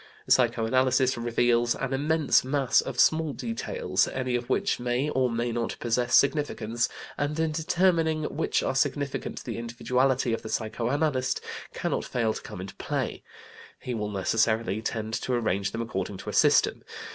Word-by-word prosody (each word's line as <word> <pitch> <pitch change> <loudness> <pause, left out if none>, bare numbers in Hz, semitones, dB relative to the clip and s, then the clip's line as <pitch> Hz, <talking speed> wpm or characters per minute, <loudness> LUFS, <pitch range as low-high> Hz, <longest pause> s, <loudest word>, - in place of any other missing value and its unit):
Psycho 115 - +3
analysis 130 +2 +2
reveals 120 0 +2
an 135 0 -3
immense 150 +2 +2
mass 135 -1 +2
of - - -6
small 160 -2 +3
details, 445 - -1
any 130 -1 -2
of 120 0 -3
which 200 +9 +1
may 125 +4 0
or 130 -2 +2
may 120 +1 -1
not 115 0 -2
possess 120 +1 +1
significance, 120 -6 +1 0.3
and 150 +2 -1
in 160 -1 +1
determining 160 0 +1
which 150 +1 -1
are - - 0
significant 140 +1 -1
the 115 -2 -5
individuality 125 +1 0
of 115 - -2
the 110 - -8
psychoanalyst 130 +5 -1 0.4
cannot - - -1
fail 115 -3 0
to - - -7
come - - -9
into 95 +1 -7
play. - - -3 0.6
He 125 - -5
will 105 -2 -2
necessarily 110 +1 +1
tend 110 0 -3
to 130 - -2
arrange 100 -5 0
them 115 +2 -3
according 110 -4 -4
to - - -6
a - - -11
system. - - +4
125 Hz, 160 wpm, -27 LUFS, 115-145 Hz, 0.6 s, system